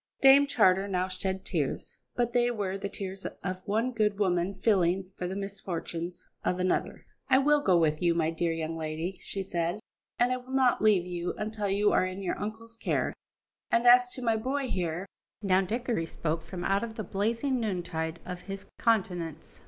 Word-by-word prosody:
Dame 275 +1 +7
Charter 195 -7 +4
now 185 -1 0
shed 190 0 -3
tears, 150 -6 -3 0.2
but 240 -1 0
they 245 0 +3
were 200 -5 -2
the 200 0 -4
tears 195 -1 -5 0.2
of 185 -1 -3
one 225 +5 +1
good 210 -4 +1
woman 185 -1 +1
feeling 185 -2 +2
for 180 - -3
the 185 - -4
misfortunes 180 -3 -5 0.2
of 180 - 0
another. 185 0 -1 0.2
"I 260 - +6
will 295 +2 +4
go 185 -9 +4
with 155 -2 +2
you, 170 -1 +3
my 160 -1 +1
dear 165 +1 0
young 165 0 -3
lady," 160 +3 -4
she 195 - -4
said, 175 +1 -1 0.4
"and 245 +1 +3
I 255 - +1
will 255 +1 -10
not 260 -2 +3
leave 205 -5 +4
you 175 -1 -3
until 215 -1 -2
you 205 +2 +3
are - - +4
in 185 +1 -6
your 180 - -2
uncle's 225 +2 -6
care. - - 0 0.6
And, 235 +1 +2
as 245 0 +7
to 255 - -6
my 225 -2 +2
boy 260 +3 -2
here 175 -1 -2 0.2
" - - -64
Now 190 -1 +4
Dickory 225 -3 -1
spoke 160 0 -2
from 175 +2 -7
out 195 +3 +1
of 225 -1 -5
the 215 - -4
blazing 230 +8 0
noontide 175 -6 -2
of 180 -1 -6
his 195 0 -5
countenance. 180 -8 -1
195 Hz, 190 wpm, -29 LUFS, 175-225 Hz, 0.6 s, Dame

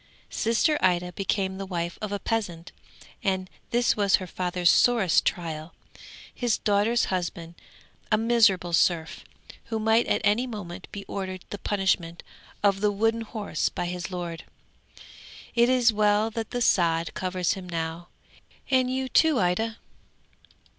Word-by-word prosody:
Sister 235 +7 +1
Ida 180 -1 +2
became 190 0 -2
the 195 - -4
wife 170 -2 -4
of 215 -2 -4
a 205 - -1
peasant, 190 -6 -3 0.5
and 190 -1 0 0.2
this 240 0 +2
was 200 -2 +4
her 185 - -3
father's 180 -1 +1
sorest 230 -8 +3
trial. 160 -2 -3 0.6
His 240 -3 0
daughter's 210 +3 +2
husband 170 -2 -3 0.6
a 215 - +5
miserable 220 -6 +3
serf, 165 -1 +1 0.4
who 225 - -3
might 220 +2 +2
at - - +1
any 215 +5 +2
moment 190 -6 -7
be 200 -1 -7
ordered 185 -2 -5
the 205 - -5
punishment 190 -4 -1 0.4
of 200 -1 +3
the 210 -1 +3
wooden 225 +3 +1
horse 220 -2 -2
by - - -4
his 180 0 -4
lord. 175 -3 -5 1.1
It 235 0 +4
is 245 -3 +4
well 210 +1 +2
that 225 -1 -4
the 245 -1 -1
sod 165 -4 +2
covers 185 -1 -1
him 185 -2 -8
now, 165 0 -4 0.6
and 255 -1 +3
you 260 0 -1
too, 315 +1 +3
Ida! 220 +6 0
195 Hz, 145 wpm, -26 LUFS, 175-225 Hz, 1.1 s, a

